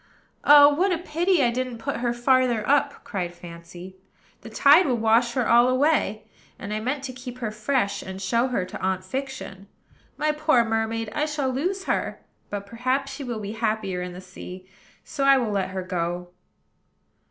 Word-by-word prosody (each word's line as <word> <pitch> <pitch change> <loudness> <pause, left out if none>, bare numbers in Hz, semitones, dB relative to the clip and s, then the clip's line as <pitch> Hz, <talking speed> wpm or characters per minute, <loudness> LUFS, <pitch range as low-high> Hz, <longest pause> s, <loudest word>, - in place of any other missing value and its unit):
"Oh, 290 0 +8
what 370 +6 +1
a 350 - +1
pity 345 0 +1
I 240 - +3
didn't 250 0 -3
put 275 +5 -3
her 240 0 -1
farther 240 -2 +2
up!" 285 +1 +1
cried 180 -4 -4
Fancy; 175 +2 -11 0.4
"the - - -10
tide 295 +5 +5
will 250 -3 +1
wash 230 +2 +3
her 250 -2 0
all 240 +1 +5
away; 255 -5 +1 0.3
and 200 +1 -6
I 215 - -1
meant 265 +5 -3
to 260 -1 -5
keep 250 0 -9
her 235 -4 -3
fresh, 215 -2 -1
and 190 0 -8
show 230 +6 +1
her 240 -8 -1
to 185 - -9
Aunt 190 0 -1
Fiction. 260 -4 -6 0.5
My 305 0 +1
poor 300 -5 +2
mermaid! 225 0 -2
I 300 +4 0
shall 295 -3 -1
lose 365 +9 -2
her; - - -2 0.3
but 200 -1 -5
perhaps 255 +6 -2
she 285 - -7
will 240 -4 -4
be 205 0 -5
happier 215 -5 -2
in 180 0 -5
the 180 - -9
sea: 185 0 -10 0.4
so 275 - -4
I 275 0 +6
will 235 -5 -1
let 195 -2 -1
her 190 0 -4
go." 175 0 -3
235 Hz, 185 wpm, -24 LUFS, 200-275 Hz, 0.5 s, Oh